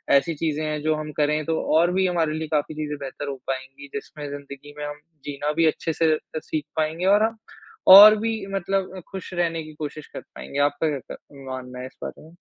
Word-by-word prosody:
ऐसी 140 +4 +3
चीज़ें 155 0 -1
हैं 150 -1 -2
जो 155 +1 +1
हम 155 0 -5
करें, 150 +1 +2
तो 160 +1 0 0.2
और 170 +2 +4
भी 190 +1 +2
हमारे 165 -4 +1
लिए 160 0 -3
काफ़ी 150 0 0
चीज़ें 150 -1 -4
बेहतर 140 +1 -6
हो 140 - -3
पाएँगी, 135 +1 -5
जिसमें 145 +1 -6
ज़िंदगी 140 0 -9
में 150 - -4
हम 145 0 -6 0.3
जीना 145 +1 -2
भी 165 +1 +3
अच्छे 160 +1 -1
से 160 0 +2
अ, 155 - -7
सीख 155 -1 -4
पाएँगे, 160 +3 0
और 205 +2 +5
हम 225 0 0 0.6
और 210 +2 +12
भी 225 +1 -1 0.2
मतलब 195 0 -1
अ, - - -5
खुश 190 -1 -7
रहने 165 -2 0
की 155 0 -11
कोशिश 150 0 -6
कर - - -8
पाएँगे। 140 - -7
आपका 155 +2 -1
कैसा 130 - -10 0.3
मानना 125 -1 -7
है 125 - -5
इस - - -18
बात - - -4
में? 160 - -15
155 Hz, 220 wpm, -24 LUFS, 145-165 Hz, 0.6 s, और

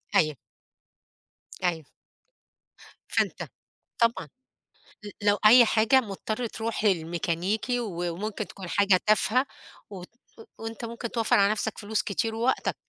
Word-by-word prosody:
أيوه. 155 -1 +3 1.3
أيوه. 165 -4 -1 1.2
فأنت - - 0 0.6
طبعًا 230 -9 +1 0.7
ل 205 - -8 0.2
لو 205 0 +4
أي 240 +3 +9
حاجة 225 +4 +4
مضطر 220 +1 -4
تروح 225 0 -4
للميكانيكي 180 +5 0
و 175 -6 -3
وممكن 210 +3 -4
تكون 190 -3 -10
حاجة 195 -1 +3
تافهة 215 +5 +3 0.4
وتن 185 -3 -9 0.3
و - - -10 0.2
وأنت 225 +1 -7
ممكن 235 0 -6
توفّر 230 -2 +2
على 200 0 +4
نَفْسك 215 +1 -3
فلوس 215 0 -1
كتير 220 +3 -2
ووقتك. 235 +4 0
215 Hz, 120 wpm, -26 LUFS, 185-230 Hz, 1.3 s, أي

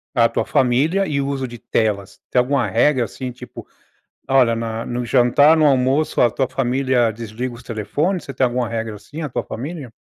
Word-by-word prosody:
a 115 -2 +4
tua - - -1
família 145 +10 +2
e 145 -4 -1
o 140 - -1
uso 135 -1 -2
de 120 -1 -8
telas? 105 -2 -2
Tem - - +3
alguma 130 0 +1
regra 130 +6 +3
assim, 125 +3 -6
tipo, 125 0 -11 0.6
olha, 130 -4 +4 0.3
no 120 0 -3
jantar, 130 +6 +4
no 155 - +4
almoço 135 +2 +2
a 120 - +5
tua 130 +3 -1
família 130 -1 +1
desliga 115 +3 -6
os 120 - -13
telefones? 145 - -2
Você 135 - -8
tem 130 - +3
alguma 120 -1 -1
regra 115 -1 -3
assim, 150 +10 -9
a 150 - -3
tua - - -3
família? 140 +1 -7
125 Hz, 190 wpm, -20 LUFS, 120-140 Hz, 0.6 s, a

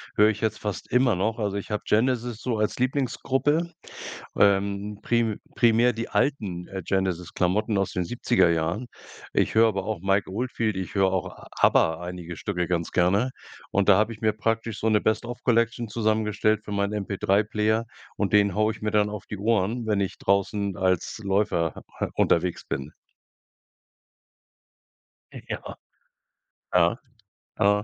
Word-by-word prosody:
höre 105 +1 +6
ich 105 -1 -2
jetzt 110 -1 -1
fast 105 -5 -5
immer 125 -3 +4
noch. 110 +5 -1
Also 100 -2 -1
ich 100 - -6
hab 105 - -2
Genesis 120 0 0
so 120 -3 -1
als 105 +2 -1
Lieblingsgruppe, 135 +5 0 0.7
ähm 100 +1 +2
prim 115 -3 +1 0.2
primär 120 +1 +4
die 115 0 -5
alten, 100 -11 -1
äh, 95 -1 -5
Genesis-Klamotten 95 +3 0
aus 95 -1 0
den 90 - -1
70er 120 -3 +2
Jahren. 85 +9 -1 0.5
Ich - - +1
höre 115 +1 +6
aber 95 -3 -2
auch 105 -4 -3
Mike 95 +1 +1
Oldfield, 115 0 -2
ich 95 -2 -5
höre 95 -2 +3
auch 95 -2 0
a - - -13
ABBA, 80 0 +4
einige 90 -1 -6
Stücke 90 -4 -2
ganz 85 -2 -2
gerne. 100 +8 +2 0.4
Und 100 0 +1
da 95 - +7
habe 110 +2 +1
ich 110 - -11
mir 110 -1 +3
praktisch 115 +1 -2
so 110 - -1
'ne 105 -1 +3
Best-of-Collection 115 +1 0
zusammengestellt 110 -1 +1
für 105 - -6
meinen 100 +1 0
MP3-Player, 105 +2 +1 0.3
und 105 - -1
den 100 -2 +4
haue 110 +1 +2
ich 110 - -13
mir 105 - -1
dann 105 -1 +2
auf 105 -2 -7
die 105 - -6
Ohren, 110 +2 0
wenn 105 -2 +1
ich 95 - -2
draußen 100 0 0
als 95 -1 0
Läufer 95 -5 +1
ha - - -10 0.2
ha - - -1
unterwegs 85 +1 +1
bin. 70 +3 -4 2.4
Ja. - - -7 1.0
Ja. 85 +3 +4 0.6
Ah. 105 +1 +3
105 Hz, 155 wpm, -25 LUFS, 95-115 Hz, 2.4 s, da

